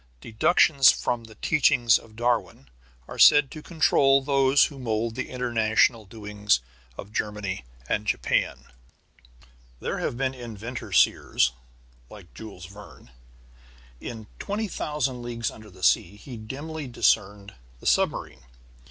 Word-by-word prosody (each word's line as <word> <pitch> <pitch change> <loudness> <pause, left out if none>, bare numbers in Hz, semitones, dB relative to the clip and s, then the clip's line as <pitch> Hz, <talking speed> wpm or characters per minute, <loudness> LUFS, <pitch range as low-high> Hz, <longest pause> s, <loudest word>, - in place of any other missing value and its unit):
Deductions 135 - +4
from 115 -1 -3
the 110 -1 -15
teachings 120 -4 +3
of 110 -1 -18
Darwin 115 - -2 0.4
are - - -9
said 145 -3 +7
to 155 - -9
control 145 -4 +3
those 135 0 +4
who 140 -3 -8
mould 115 -2 -2
the - - -5
international 115 -2 +1
doings 105 - -1 0.4
of 105 +1 -10
Germany 105 -11 -3 0.2
and - - -2
Japan. - - 0 1.2
There - - -3
have 120 - -3
been 130 0 -1
inventor 120 -1 -8
seers - - +3 0.6
like 95 -5 -14
Jules 100 -5 -10
Verne. 100 -8 -14 0.9
In 110 -2 -8
Twenty 210 +2 -3
Thousand 150 -8 -3
Leagues 120 -1 -3
under 110 -1 -13
the 95 -1 -15
Sea 100 - +2
he 120 +4 -10
dimly 140 +7 -7
discerned 105 -4 0 0.3
the - - -16
submarine. - - 0
115 Hz, 125 wpm, -25 LUFS, 105-135 Hz, 1.2 s, said